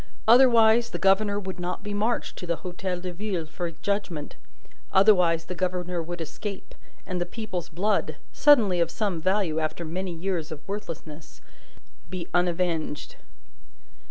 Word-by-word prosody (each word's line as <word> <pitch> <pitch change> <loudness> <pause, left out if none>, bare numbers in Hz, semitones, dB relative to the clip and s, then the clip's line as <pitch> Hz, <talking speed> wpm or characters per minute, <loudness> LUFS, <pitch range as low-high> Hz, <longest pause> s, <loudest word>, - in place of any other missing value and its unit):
Otherwise, 235 -1 +6
the - - -4
governor 200 +3 +3
would 190 -2 -6
not 180 +2 -4
be 205 -1 -4
marched 215 +4 -1
to 180 - -7
the 170 - +1
Hotel 180 0 -3
de 180 0 -5
Ville 185 -3 -3
for 170 +2 -4
judgment. 165 -3 -3 0.6
Otherwise, 180 -5 +5
the - - -5
governor 180 -1 -2
would 175 +1 -6
escape, 195 +5 -6 0.3
and 180 -2 -3
the - - +3
people's 185 -2 -5
blood 185 -2 0 0.2
(suddenly 225 -12 +5
of 170 - +2
some 195 -7 -2
value, 185 -3 +1
after 160 +2 -3
many 180 +3 -3
years 170 -1 -3
of 155 -1 -8
worthlessness) 165 -6 -7 0.7
be 180 -2 -5
unavenged. 175 -3 -1
180 Hz, 145 wpm, -26 LUFS, 170-205 Hz, 0.7 s, Otherwise